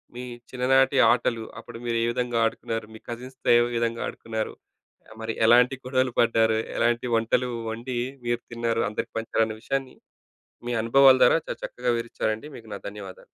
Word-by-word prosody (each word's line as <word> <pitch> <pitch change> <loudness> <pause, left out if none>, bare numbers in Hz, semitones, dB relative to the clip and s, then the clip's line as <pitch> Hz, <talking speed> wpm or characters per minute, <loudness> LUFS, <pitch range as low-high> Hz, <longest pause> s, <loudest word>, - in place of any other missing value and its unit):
మీ 125 - -6 0.3
చిన్ననాటి 135 +2 +3
ఆటలు, 120 -2 0 0.2
అప్పుడు 115 - -10
మీరు 115 -1 0
ఏ - - +2
విధంగా 120 -1 -1
ఆడుకున్నారు? 115 0 -3
మీ - - -10
కజిన్స్‌తో 125 +2 -6
ఏ - - +6 0.2
విధంగా 115 0 -1
ఆడుకున్నారు? 110 -1 -4 0.7
మరి 110 0 -3
ఎలాంటి 125 +3 +5
గొడవలు 130 0 +1
పడ్డారు? 115 -1 +3 0.2
ఎలాంటి 120 +1 +1
వంటలు 125 +2 +1 0.2
వండి, 120 +2 -5 0.3
మీరు 120 0 0
తిన్నారు. 115 -1 -1
అందరికి 105 - -5
పంచాలన్న 115 -1 0
విషయాన్ని, 135 -1 -3 0.7
మీ - - -1
అనుభవాల 135 +3 +6
ద్వారా, - - +6
చాలా - - -6
చక్కగా 125 0 -1
వివరిచ్చారండి, 115 +2 -3
మీకు 115 -2 -13
నా - - -5
ధన్యవాదాలు. 100 -2 -10
120 Hz, 150 wpm, -25 LUFS, 115-125 Hz, 0.7 s, ఏ